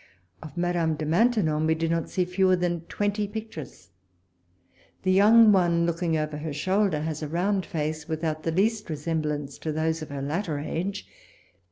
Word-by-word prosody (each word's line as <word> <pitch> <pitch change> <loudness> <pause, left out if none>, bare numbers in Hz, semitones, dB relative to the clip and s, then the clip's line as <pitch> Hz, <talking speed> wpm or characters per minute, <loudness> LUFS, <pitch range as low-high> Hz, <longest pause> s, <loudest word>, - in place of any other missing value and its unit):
Of 155 -1 -10
Madame 175 -2 +1
de 155 0 -4
Maintenon 165 -4 +2
we 160 - +3
did 165 0 -1
not 165 -1 -1
see 180 - 0
fewer 185 +1 +3
than 175 -2 -2
twenty 205 +2 -1
pictures. 165 - -8 1.1
The 185 - +2
young 215 +3 +7
one 170 -3 +3
looking 170 -1 0
over 155 -1 -2
her 150 0 -5
shoulder 185 +1 +1
has 155 0 -3
a 155 - -3
round 185 +4 0
face, 155 -1 -3
without 160 -1 -2
the 165 - -1
least 210 +4 0
resemblance 150 -2 -3
to 155 - -3
those 160 +1 -1
of 155 - -7
her 140 -1 -5
latter 155 +2 -2
age. 185 +7 -4
165 Hz, 170 wpm, -26 LUFS, 155-190 Hz, 1.1 s, young